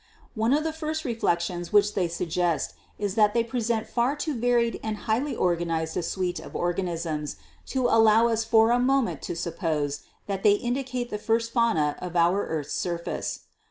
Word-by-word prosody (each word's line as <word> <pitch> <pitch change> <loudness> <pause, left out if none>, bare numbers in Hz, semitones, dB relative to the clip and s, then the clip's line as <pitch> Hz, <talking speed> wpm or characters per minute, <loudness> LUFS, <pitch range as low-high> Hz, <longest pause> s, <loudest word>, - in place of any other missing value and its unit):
One 225 +1 +1
of 295 +2 +3
the 320 0 -2
first 315 0 -3
reflections 175 -7 -1
which 210 0 +4
they 185 -3 +1
suggest 170 0 -1 0.2
is 205 -2 -2
that 210 0 +3
they 235 - +3
present 230 -1 -1
far 245 +4 0
too 300 +1 -2
varied 235 -1 +1
and 220 -1 -3
highly 245 +7 0
organized 165 -2 0
a - - 0
suite 180 +1 -2
of - - -11
organisms 170 -4 -2 0.3
to 260 -2 -1
allow 225 0 +5
us 225 -1 +1
for 225 0 +4
a 245 - +3
moment 265 0 +1
to - - -4
suppose 155 -4 -2 0.3
that 195 -1 -3
they 205 0 +6
indicate 250 +2 -2
the 210 - -3
first 230 +2 0
fauna 170 - +2
of 180 -1 -6
our 175 +4 +3
earth's 150 -2 -3
surface. 170 -1 -3
210 Hz, 175 wpm, -26 LUFS, 175-235 Hz, 0.3 s, they